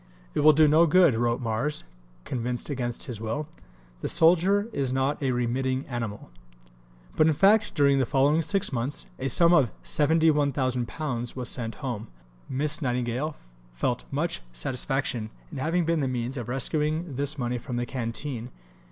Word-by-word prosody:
"It - - -1
will 155 +1 +7
do 155 +1 +5
no 160 +3 +5
good," 175 -3 +5
wrote 120 +2 0
"Mars," 115 +6 -2 0.4
convinced 125 +2 -3
against 120 -3 -3
his 120 -5 -7
will; 145 +7 -3 0.5
"the - - -3
soldier 185 +5 +4
is 135 -7 -1
not 135 +3 0
a 135 - 0
remitting 130 +2 -1
animal." 115 - -5 0.8
But 155 - +4
in 160 - +2
fact, 210 +5 +4
during 140 -1 +4
the 130 - +1
following 145 +4 +3
six 195 -1 0
months, 130 +4 -3
a 135 - -2
sum 170 +7 +6
of 135 - +4
£71,000 140 - +1
was 125 -2 -3
sent 115 -3 -3
home. 120 -5 -4 0.4
Miss 150 +4 -1
Nightingale 125 +3 -1 0.4
felt - - -1
much - - -2
satisfaction 125 - -1 0.2
in - - -6
having 165 +5 0
been 165 0 +1
the 140 - 0
means 125 +1 -3
of 120 -3 -5
"rescuing 150 +4 -1
this 145 +3 -2
money 125 -1 -2
from 120 +1 -6
the 120 0 -1
canteen." 120 0 -5
135 Hz, 160 wpm, -26 LUFS, 120-150 Hz, 0.8 s, will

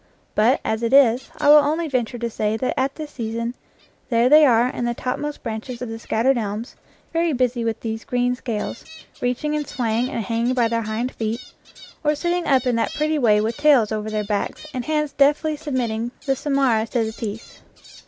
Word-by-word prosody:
But, 230 +6 +3
as 220 +1 -1
it 230 +2 -1
is, 260 -3 +5
I - - 0
will 300 - +10
only 320 +3 0
venture 245 -4 -1
to 235 0 -2
say 215 -1 -1
that 255 - -1
at 270 +1 0
this 305 -2 -7
season 230 -1 -3 0.6
there 235 0 +3
they 305 +1 +8
are 240 -1 +4
in 245 -1 -3
the 240 0 -1
topmost 290 +5 -4
branches 230 +2 -5
of 250 - -5
the 225 0 -6
scattered 240 +3 +1
elms, 215 +3 -4 0.4
very 330 -1 +1
busy 250 -2 0
with 225 -1 -2
these 225 0 -4
green 245 0 0
scales, 235 -3 -4 0.4
reaching 250 +5 -1
and 300 -1 -2
swaying 235 0 -1
and 235 -6 -3
hanging 230 +4 0
by 235 -2 +2
their 230 0 0
hind 225 +3 -2
feet, 225 +2 -4 0.5
or 300 0 +2
sitting 345 +3 -1
up 265 -2 +3
in 245 -2 +1
that 225 - -1
pretty 305 0 0
way 210 -5 +4
with 225 +2 -2
tails 285 -8 +4
over 215 0 -2
backs 205 +7 -3
and 250 -2 -4
hands 300 -1 -1
deftly 295 +2 +3
submitting 245 -6 -2 0.2
the 270 -1 +1
samara 265 -6 +1
to 235 0 0
the 220 - -3
teeth. 220 -1 -7
245 Hz, 200 wpm, -22 LUFS, 225-275 Hz, 0.6 s, will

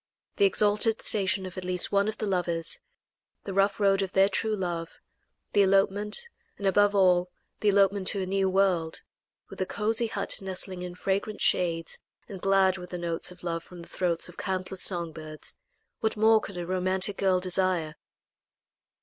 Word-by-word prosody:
The 405 - +5
exalted 215 - +2
station 195 -2 +1
of 185 0 -6
at - - -8
least 180 -1 +1
one 200 +1 +2
of 215 0 -3
the 215 - -3
lovers; 175 -4 0 0.6
the 195 - -5
rough 195 +2 +2
road 195 -1 +3
of 195 -1 -3
their 195 +1 +4
true 215 +2 -1
love; 170 -4 -4 0.6
the 205 - +5
elopement, 200 - +2 0.3
and, 200 - -6
above 205 +1 +3
all, 180 -2 +4 0.3
the 210 - +2
elopement 200 -1 +3
to 200 - +1
a - - -2
new 190 0 +1
world, 185 -4 +1 0.5
with - - -8
a 185 - -1
cosy 225 +2 0
hut 200 -3 -2
nestling 190 -1 -4
in 180 0 -6
fragrant 195 +3 -2
shades 165 -2 +1 0.3
and 190 -3 -9
glad 195 -1 +3
with 180 - -9
the 180 - -5
notes 170 -1 -3
of 180 0 -14
love 165 -1 -3
from 175 -1 -12
the - - -15
throats 175 -3 -1
of 175 - -13
countless 185 -1 -3
song 170 -3 +2
birds 155 -1 -9 0.5
what 220 -1 -1
more 220 +1 +5
could 195 - -8
a 175 - -4
romantic 185 +2 0
girl 190 -2 +2
desire? 180 -3 0
190 Hz, 180 wpm, -27 LUFS, 180-200 Hz, 0.6 s, The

